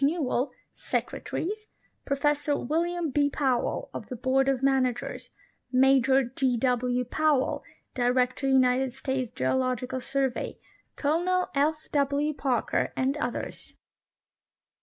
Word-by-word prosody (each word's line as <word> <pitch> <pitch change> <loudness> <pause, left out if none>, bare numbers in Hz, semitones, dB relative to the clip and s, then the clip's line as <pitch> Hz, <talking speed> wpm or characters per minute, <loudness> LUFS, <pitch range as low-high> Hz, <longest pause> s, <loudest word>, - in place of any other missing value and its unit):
Newell, 280 -3 +1 0.2
Secretaries; 430 +5 -3 0.4
Professor 290 +1 +1
William 335 +3 -1
B 285 +1 +2
Powell, 265 -4 -1
of - - -7
the 255 - -4
Bqard 265 +3 +2
of 265 -1 -3
Managers; 260 -3 0 0.4
Major 265 0 +4
J. 250 0 0
W. 250 0 +1
Powell, 295 +1 +1 0.3
Director 250 +2 +1
United 260 0 +3
States 265 -2 -2
Geological 255 - -1
Survey; 270 -1 -2 0.4
Colonel 350 +5 +1
F. 305 +2 0
W. 285 +1 +1
Parker, 260 -5 0
and 265 +2 +1
others. 245 -4 -5
270 Hz, 105 wpm, -27 LUFS, 255-290 Hz, 0.4 s, Major